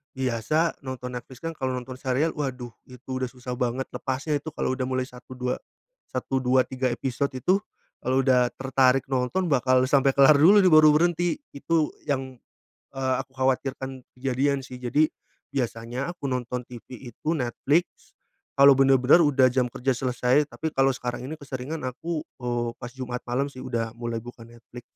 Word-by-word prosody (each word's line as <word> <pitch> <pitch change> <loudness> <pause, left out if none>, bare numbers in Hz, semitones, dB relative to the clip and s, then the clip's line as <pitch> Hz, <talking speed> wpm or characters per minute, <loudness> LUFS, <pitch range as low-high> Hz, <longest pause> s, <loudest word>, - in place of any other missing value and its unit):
biasa 130 +6 0
nonton 125 -1 -6
Netflix 125 +1 -9
kan 165 - -2
kalau 130 0 -1
nonton 125 +1 -6
serial 130 +5 +1
waduh 130 -4 -3 0.2
itu 125 0 -15
udah 130 - 0
susah 125 -1 -6
banget 125 +2 -1
lepasnya 140 +3 -2
itu 160 +3 -7
kalau 130 - -1
udah 130 - -1
mulai 130 0 -1
1, 125 0 -12
2, 125 0 -1 0.6
1, 135 - -1
2, 130 0 +3
3 130 -1 -1
episode 135 +3 -2
itu, 180 +9 +2 0.5
kalau 130 +2 +2
udah 125 -2 +3
tertarik 135 0 +2
nonton 130 +9 0
bakal 130 -1 +4
sampai 135 0 +4
kelar 140 +2 +7
dulu 175 +9 +7
nih - - +6
baru 155 0 +8
berhenti. 175 - +1 0.2
Itu 155 +2 0
yang, 135 -2 -2 0.6
eee, 130 -1 0
aku 135 0 -16
khawatirkan 130 0 -1 0.2
kejadian 135 +2 0
sih. 125 -1 -9
Jadi, 145 +5 +2 0.5
biasanya 120 +3 -2
aku 160 -5 -6
nonton 125 -1 -3
TV 125 +1 -10 0.2
itu 155 - -2
Netflix, 145 +4 -1 0.5
kalau 140 0 +9
bener-bener 135 +4 +5
udah 140 -3 +4
jam 125 -1 +1
kerja 130 +1 0
selesai, 125 +3 +1
tapi 160 - -4
kalau 135 0 +4
sekarang 125 -1 -4
ini 155 - -5
keseringan 140 +3 -5
aku, 155 +5 -4 0.2
eee, 120 -1 -1
pas 120 -1 -7
Jumat 125 -2 -5
malam 130 +4 0
sih 130 - -9
udah 115 -2 -3
mulai 115 -1 -3
buka 120 -1 -11
Netflix. 120 +1 -13
130 Hz, 170 wpm, -25 LUFS, 125-140 Hz, 0.6 s, kalau